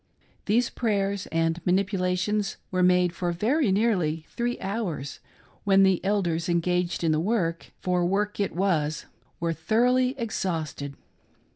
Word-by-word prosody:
These 235 +4 +2
prayers 200 -4 -1
and 165 +1 0
manipulations 190 +2 0
were 185 -1 +1
made 180 -1 +4
for 175 0 -2
very 225 - +1
nearly 180 -7 +1
three 240 0 -2
hours, 190 - -4 0.4
when 195 -1 +5
the 190 -2 +3
elders 180 -5 0
engaged 175 +1 0
in 165 - +3
the 155 - +2
work 170 -3 -1
— - - -44
for 180 -1 +1
work 205 +4 0
it 200 - -1
was 160 -6 0 0.2
— 120 - -38
were 170 -1 0
thoroughly 250 - +2
exhausted. 165 - -3
185 Hz, 140 wpm, -26 LUFS, 170-210 Hz, 0.4 s, when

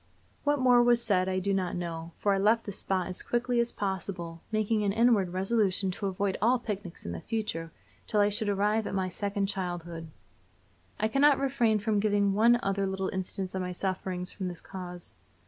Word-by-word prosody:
What 290 0 +2
more 250 -2 +5
was 240 -1 +4
said 190 -3 +2
I 185 - 0
do 195 +1 0
not 185 -2 -1
know, 170 -1 -5
for 200 - +2
I 195 - +1
left 220 +3 +3
the 205 - -5
spot 190 -1 -1
as 185 - -5
quickly 240 0 0
as 235 0 +1
possible, 185 -4 -4
making 215 0 +1
an 200 - +2
inward 225 -3 +3
resolution 190 0 +1
to 200 +2 -3
avoid 195 0 -1
all 240 +4 +4
picnics 205 -6 -6
in 85 - -3
the 85 -1 -5
future 205 -7 -3 0.4
till 210 - +2
I 205 0 +5
should 210 +1 -1
arrive 210 +2 +1
at - - -3
my 190 -1 0
second 200 +2 -1
childhood. 175 -4 -4 0.9
I 215 - +2
cannot 275 +4 +4
refrain 245 -5 +2
from 210 0 0
giving 205 -1 +2
one 235 +4 +5
other 195 0 0
little 190 0 -2
instance 190 0 -3
of 190 - -2
my 180 0 -3
sufferings 185 -1 -3
from 190 -2 -4
this 175 -2 -5
cause. 180 -2 -8
195 Hz, 200 wpm, -29 LUFS, 185-220 Hz, 0.9 s, more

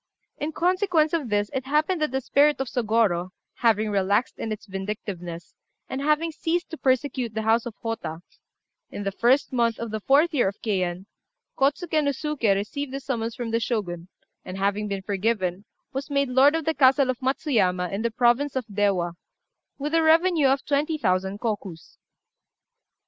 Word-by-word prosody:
] - - -50
In 305 - -1
consequence 350 -2 +1
of 305 -8 -1
this 205 0 0
it 265 -1 -2
happened 310 +4 +1
that 305 - +1
the 265 +1 -2
spirit 290 +3 +3
of 270 - -2
Sôgorô 215 -7 +1 0.3
having 220 -2 +2
relaxed 200 +4 +1
in 220 - -3
its 215 - -5
vindictiveness, 190 -4 -6 0.3
and 265 - -4
having 305 +3 +1
ceased 335 +2 -2
to 320 - -5
persecute 255 -4 0
the 220 - -1
house 225 +2 +2
of 225 - -8
Hotta, 200 -8 -4 0.7
in 205 - -6
the 195 - -1
1st 255 +7 +2
month 235 -2 +1
of 230 -2 -5
the 215 0 -3
4th 295 - +3
year 255 -8 +3
of 195 - -4
Keian, 185 -4 -1 0.5
Kôtsuké 305 +3 +1
no 285 - +2
Suké 280 -7 0
received 260 +8 -4
a - - -3
summons 235 -4 -3
from 235 -2 -4
the 230 - +1
Shogun, 185 -8 -3 0.4
and, 185 - -7
having 200 +2 0
been 195 -1 -4
forgiven, 200 -2 -1 0.3
was 270 +2 -4
made 280 -2 +1
lord 270 +4 +5
of 325 -2 -2
the 320 - +1
castle 265 -2 +4
of 250 - -8
Matsuyama, 220 - 0
in 195 +2 -2
the 235 - 0
province 245 +5 +2
of 260 -3 -1
Déwa, 200 -5 0 0.6
with 295 +2 -4
a 330 - +4
revenue 325 -1 +4
of 270 +1 +1
twenty 295 +2 0
thousand 190 -3 0
kokus. 205 -7 -5
235 Hz, 180 wpm, -25 LUFS, 200-285 Hz, 0.7 s, lord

